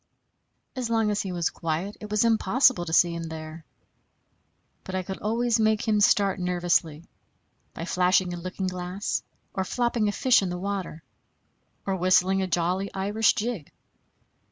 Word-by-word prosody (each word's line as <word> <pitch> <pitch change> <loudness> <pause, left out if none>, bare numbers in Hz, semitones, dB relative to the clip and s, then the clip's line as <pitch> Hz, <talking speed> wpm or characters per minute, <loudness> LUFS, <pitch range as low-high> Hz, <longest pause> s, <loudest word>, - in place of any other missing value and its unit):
As 250 -3 -3
long 225 -2 +2
as 205 - 0
he 190 - -4
was 170 -2 -1
quiet, 165 +5 -3
it 210 - -8
was 210 +2 +2
impossible 230 -2 +3
to 160 - -5
see 170 +1 +4
him 170 0 -5
there; 160 0 -8 1.2
but 190 - -6
I 185 - -1
could 190 +1 -6
always 230 +2 0
make 220 0 +1
him 210 -1 +2
start 200 -1 +3
nervously 175 -3 0 0.7
by 165 - -5
flashing 180 0 +2
a - - -5
looking 185 +2 -5
glass, 180 +2 -3 0.3
or 190 - -1
flopping 235 +1 0
a - - +1
fish 250 +2 +3
in 190 - -2
the 180 - -3
water, 185 -4 -4 0.8
or 195 - 0
whistling 185 +1 +3
a 190 - -1
jolly 180 +3 -1
Irish 205 +3 +2
jig. 215 -8 -3
190 Hz, 160 wpm, -26 LUFS, 175-210 Hz, 1.2 s, see